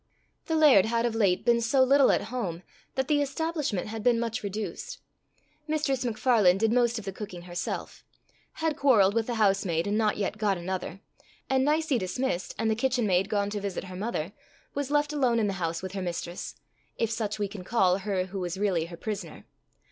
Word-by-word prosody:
The 320 - 0
laird 280 -11 +6
had 230 +1 +1
of 235 - 0
late 200 -5 +2
been 235 -1 +4
so 260 +4 +3
little 275 +1 +5
at - - +1
home, 185 -8 -3 0.3
that 265 -1 0
the 295 -1 +3
establishment 290 - -2
had 220 0 -5
been 235 +1 +3
much 230 0 -2
reduced; 215 - -5 0.7
Mistress 300 -4 0
MacFarlane 220 -5 +3
did 220 +2 +2
most 240 -1 +2
of 220 - -6
the 195 - -3
cooking 185 -3 -8
herself; 175 0 -5 0.5
had 320 -2 -1
quarrelled 230 -10 +4
with 230 0 0
the 240 - -2
housemaid 195 -6 +2
and 205 +2 0
not 215 -1 +1
yet 210 +1 -2
got 205 -3 +1
another; 185 +1 -5 0.5
and, 265 0 +3
Nicie 300 -2 +2
dismissed, 185 0 -2
and 225 -1 +1
the - - +1
kitchen 250 0 +1
maid 190 0 +2
gone 205 -2 0
to 205 -1 -3
visit 200 -2 -3
her 185 -1 -9
mother, 195 -3 -3 0.4
was 285 -1 -2
left 295 0 +1
alone 255 -5 +2
in 225 - +2
the 200 - 0
house 165 +1 -2
with 190 - -4
her 195 0 -4
Mistress, 175 0 -5 0.4
if 230 -1 0
such 215 -2 -2
we 205 -1 -1
can 200 -2 -8
call 190 -3 +2
her 190 -2 -1
who 190 +1 -6
was 180 0 -3
really 190 -5 +1
her 170 0 -10
prisoner. 195 -5 -6
215 Hz, 200 wpm, -28 LUFS, 190-250 Hz, 0.7 s, laird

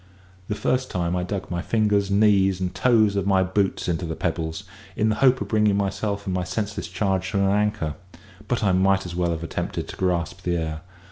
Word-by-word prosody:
The 105 - -2
first 130 +5 0
time 85 -1 -1
I 90 - 0
dug 95 +1 -4
my 85 0 -1
fingers, 105 -2 +1
knees, 100 -2 +3
and 90 -1 -2
the - - -23
toes 110 -5 +3
of 100 -1 0
my 95 -1 +4
boots 95 +1 0
into 85 +1 -1
the 80 -1 -3
pebbles, 80 0 -3 0.3
in 110 - +2
the 110 - +1
hope 130 -1 +5
of - - -3
bringing 105 -2 +3
myself 100 +1 -2
and 95 - -2
my 90 -1 0
senseless 100 +2 -3
charge 95 +1 -1
to - - +1
an 100 - +3
anchor; 100 -6 +1 0.5
but 120 -2 -1
I 100 - +3
might 95 +1 +3
as 85 -1 -6
well 90 -1 0
have 85 -1 -3
attempted 80 - -4
to - - -7
grasp 90 -4 -1
the 85 -1 -1
air. 80 -1 -3
95 Hz, 220 wpm, -24 LUFS, 90-105 Hz, 0.5 s, hope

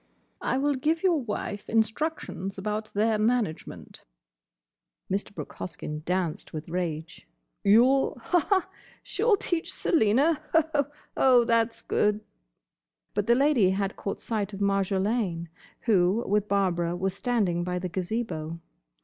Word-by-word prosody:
"I - - 0
will 290 +2 +2
give 310 +6 0
your 345 -6 +3
wife 210 -3 -5
instructions 220 - -1
about 210 +2 -3
their 215 +1 +2
management—" 220 -6 -2 1.1
Mr. 200 +2 -1
Brooke - - -8
Hoskyn 150 -3 -6
danced 180 -3 -2
with 155 0 -6
rage. 165 -2 -4 0.4
"You'll—haha!—She'll 350 - +2
teach 345 -3 -2
Selina!—Hoho!—Oh, 290 - +2
that's 230 0 +1
good!" 210 0 +1 0.9
But 205 0 -1
the 235 - +5
Lady 270 -7 +4
had 195 +1 -1
caught 200 - -4
sight 210 -3 -3
of 195 - -6
Marjolaine, 195 -2 0 0.3
who 200 0 +3
with 210 +1 +1
Barbara 175 -4 +1
was 190 +1 -1
standing 195 -5 0
by 180 0 -2
the 180 0 -3
Gazebo. 175 -4 -3
210 Hz, 115 wpm, -27 LUFS, 185-250 Hz, 1.1 s, the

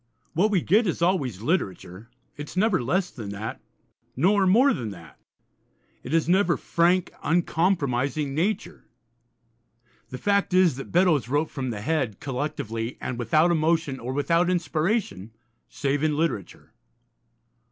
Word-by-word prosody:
What 195 +7 +2
we 195 -5 +2
get 215 +5 +3
is 170 -1 -1
always 135 - 0
literature; 100 - -3 0.3
it 145 0 -7
is - - -10
never 210 - +2
less 180 +9 0
than 110 -5 -8
that, 100 +2 -6 0.5
nor 190 +7 +3
more 245 +9 +5
than 115 -5 -4
that. 85 -8 -12 0.8
It 125 - -8
is 165 -1 +2
never 180 -1 +3
frank, 175 +2 +1
uncompromising 150 -5 0
nature. 185 +9 -2 1.2
The 125 - -6
fact 200 +6 +1
is, 185 -6 +4
that 135 - -8
Beddoes 170 - +3
wrote 145 +3 0
from 130 -3 -4
the 105 -3 -5
head, 130 -5 -1
collectively, 125 -4 -4
and 125 - -5
without 155 +9 +3
emotion, 160 -4 +1
or 125 +2 -5
without 165 +6 +1
inspiration, 165 - -1 0.4
save 140 0 -1
in 155 -1 +1
literature. 155 - -3
155 Hz, 140 wpm, -25 LUFS, 125-180 Hz, 1.2 s, more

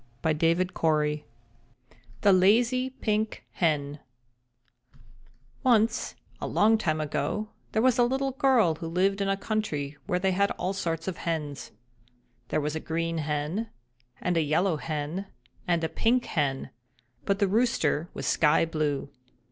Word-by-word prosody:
THE 160 -2 +1 1.1
LAZY 235 +7 +4
PINK 215 0 -1
HEN 145 -4 0 1.6
Once, 230 -3 +2 0.3
a - - -2
long 220 +1 +3
time 155 -6 0
ago, 210 +7 -2 0.2
there 220 - +1
was 255 -1 +3
a - - +6
little 265 +2 0
girl 260 - +3
who 165 +1 -6
lived 195 +4 +1
in 195 - 0
a 195 - +1
country 155 -10 -2
where 180 - +1
they 190 +1 +1
had 200 +2 +2
all 185 +2 -1
sorts 165 -3 -3
of 185 - -3
hens. 150 -4 -3 0.8
There - - 0
was 150 +1 -2
a - - -1
Green 165 +1 -2
Hen 155 +8 -2 0.5
and 180 - 0
a - - +4
Yellow 160 +3 +1
Hen 155 +5 -4 0.4
and 170 -2 +1
a - - +2
Pink 235 +9 +1
Hen; 135 -4 -1 0.5
but 200 -1 +1
the 200 -1 +2
Rooster 185 -7 +1
was - - -4
Sky 155 +1 +3
Blue. 150 -4 -2
175 Hz, 140 wpm, -27 LUFS, 155-215 Hz, 1.6 s, a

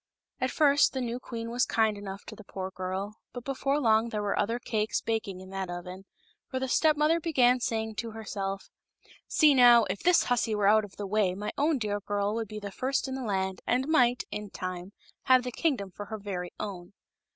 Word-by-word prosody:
At 255 - 0
first 285 0 +4
the 265 - -2
new 240 0 -3
queen 230 -2 -6
was 245 +1 +1
kind 220 -2 +2
enough 200 -1 -8
to - - -9
the 215 - -12
poor 190 -1 -6
girl; 190 +3 -4 0.2
but 245 - -7
before 275 +1 0
long 225 -3 +3
there 210 -2 -3
were 200 - 0
other 230 +3 0
cakes 220 -2 -1
baking 220 -5 -3
in 190 0 -11
that 190 -1 -4
oven, 180 +2 -7 0.4
for 260 - -4
the 265 - -2
step 305 +4 +3
mother 310 +3 +3
began 255 -7 +3
saying 220 -2 -2
to 230 - -3
herself: 200 -3 -5 0.3
" - - -26
See, 305 -3 +5
now, 240 -3 +7
if 200 - -4
this 355 0 +4
hussy 235 -3 +1
were 205 -1 +2
out 215 +1 +5
of 195 - -15
the 205 - -5
way 195 -2 +1
my 210 +2 -4
own 295 +1 +2
dear 210 -3 -2
girl 205 0 -1
would 225 0 -2
be 215 +1 -7
the 200 -1 -6
first 265 +6 -1
in 265 - -4
the 265 - -4
land, 190 -4 -2
and 255 +3 +1
might, 250 -6 +3
in 210 -1 -5
time, 185 0 -6 0.3
have 255 -1 +5
the 250 - -4
kingdom 235 - -1
for 205 +3 -8
her 220 - -5
very 190 -4 -5
own." 185 -3 -6
220 Hz, 220 wpm, -29 LUFS, 200-250 Hz, 0.4 s, now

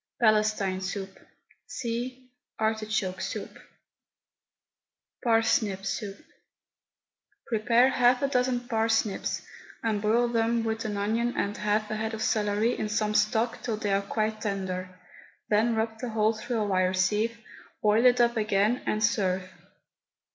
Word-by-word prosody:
PALESTINE 215 -4 +2
SOUP. 195 0 -5 0.5
(See 250 +2 -5 0.3
ARTICHOKE 215 -3 -1
SOUP.) - - -5 1.6
PARSNIP 225 -4 +2
SOUP. 205 -3 -3 1.3
Prepare 235 +2 +3
half 250 0 +3
a - - +3
dozen 250 -2 +1
parsnips, 225 -3 0 0.4
and 215 -3 0
boil 230 +3 +3
them 230 0 +1
with 220 0 -2
an 210 -1 -2
onion 225 +4 0
and 200 +1 -1
half 210 +1 0
a 215 - -1
head 220 +1 -2
of 220 - -4
celery 210 +2 +1
in 215 - -2
some 210 0 0
stock 220 +2 +1
till 225 -3 -2
they 205 -2 -1
are 195 - +2
quite 215 +2 -2
tender. 190 -3 -3 0.6
Then 225 +2 +3
rub 220 0 -2
the 250 - -4
whole 220 0 +2
through 230 +2 -4
a - - +1
wire 185 -2 +1
sieve, 215 +5 +1 0.5
boil 215 +2 +4
it 245 0 +4
up 235 0 +3
again, 215 +2 +1
and 215 0 0
serve. 190 -4 +1
220 Hz, 135 wpm, -27 LUFS, 205-230 Hz, 1.6 s, boil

